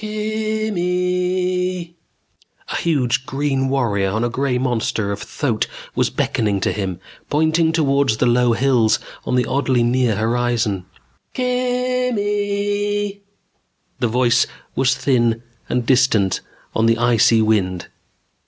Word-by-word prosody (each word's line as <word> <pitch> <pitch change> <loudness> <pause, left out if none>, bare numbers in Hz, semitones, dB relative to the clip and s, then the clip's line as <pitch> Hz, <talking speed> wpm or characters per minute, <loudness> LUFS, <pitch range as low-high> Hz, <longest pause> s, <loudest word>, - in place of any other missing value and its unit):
Kimmm 215 -1 -2
eee! 180 0 -1 0.7
A - - -3
huge 135 -5 0
green 135 -1 0
warrior 110 -8 +1
on 110 +4 -1
a 120 - -1
gray 130 0 0
monster 115 -5 -1
of 100 - -4
a - - -7
thoat 125 -8 -1 0.3
was - - +1
beckoning 105 -3 0
to - - +1
him. 95 -4 -3 0.3
Pointing 160 +2 +2
toward 140 -4 +2
the 110 +3 +2
low 120 0 +3
hills 120 -3 +3 0.3
on - - 0
the 125 - +2
oddly 130 -3 +1
near 120 -2 +2
horizon. 110 -4 0 0.5
Kimmmm 250 0 0
eeeee! 205 0 -1 0.8
The 120 - +1
voice 120 +1 +2 0.3
was 130 0 +2
thin 120 -4 +1 0.3
and 125 -1 0
distant 120 -7 +2 0.3
on 110 +1 +3
the 115 0 +3
icy 115 -1 +4
wind. 95 -5 0
130 Hz, 125 wpm, -20 LUFS, 115-180 Hz, 0.8 s, icy